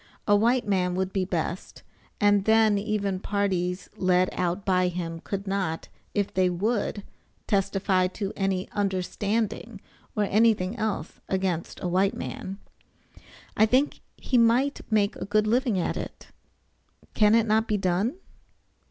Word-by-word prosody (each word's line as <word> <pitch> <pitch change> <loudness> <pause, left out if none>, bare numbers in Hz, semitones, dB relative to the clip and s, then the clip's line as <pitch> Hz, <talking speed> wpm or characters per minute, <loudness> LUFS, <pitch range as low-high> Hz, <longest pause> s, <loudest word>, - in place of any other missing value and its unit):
A 205 - +5
white 235 +4 +2
man 180 -3 +1
would 190 0 -2
be 190 -2 0
best, 175 0 -4 0.4
and 205 -1 +3
then 220 -2 +4
even 200 -2 -1
parties 185 -3 -1
led 185 0 +2
out 180 +2 -2
by 185 -1 +3
him 170 -2 -4
could 200 +3 -5
not, 190 -5 -2 0.3
if 205 -2 0
they 185 -1 +3
would, 205 +3 -1 0.4
testify 195 -2 +1
to 195 +2 -5
any 195 -1 -1
understanding 205 +3 -2 0.4
or 210 - +2
anything 210 -1 +2
else 215 -8 -3
against 190 -3 -2
a - - 0
white 190 +3 +2
man. 195 +1 -6 1.0
I 220 - +5
think 260 +6 +2 0.2
he 250 - +1
might 245 +5 +3
make 205 -2 +2
a - - -5
good 215 +1 +2
living 235 -1 +1
at 180 - -1
it. - - -8 0.8
Can 210 0 +5
it 230 -1 +4
not 220 +1 +2
be 210 - +1
done? 190 - 0
200 Hz, 145 wpm, -26 LUFS, 185-215 Hz, 1.0 s, A